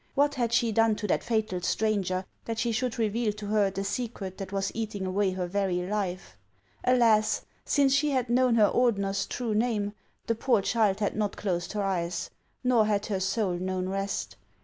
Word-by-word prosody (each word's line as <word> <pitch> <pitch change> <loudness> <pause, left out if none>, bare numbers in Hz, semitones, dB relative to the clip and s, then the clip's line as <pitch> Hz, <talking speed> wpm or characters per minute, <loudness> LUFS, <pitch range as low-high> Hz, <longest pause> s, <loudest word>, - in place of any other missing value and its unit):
"What 290 +1 +3
had 240 -4 -1
she 235 -1 +2
done 225 0 +3
to 210 - -5
that - - +1
fatal 220 -6 -1
stranger, 190 -2 0 0.2
that 230 -1 -3
she 235 +1 0
should 245 +1 -1
reveal 225 0 +1
to 210 0 -8
her 205 -1 +2
the 195 +1 -4
secret 200 -3 -4
that 195 -1 -6
was 195 0 -1
eating 215 -3 -3
away 190 +1 +1
her 185 -1 -2
very 180 -1 0
life? 185 - -3 0.5
Alas! 230 -4 +3 0.2
since 280 -2 +3
she 290 +2 +3
had 260 -3 0
known 245 0 +3
her 215 -2 +6
Ordener's 200 -5 +1
true 235 -3 -2
name, 210 -2 0 0.3
the 230 - +1
poor 230 -2 +2
child 215 -3 +1
had 205 - 0
not 210 -1 -1
closed 175 -3 -2
her 210 -1 -1
eyes, 175 -2 -2 0.3
nor 240 -4 +4
had 205 -1 +1
her 195 -3 -1
soul 190 0 0
known 185 +1 -2
rest. 195 - -3
210 Hz, 190 wpm, -28 LUFS, 195-230 Hz, 0.5 s, her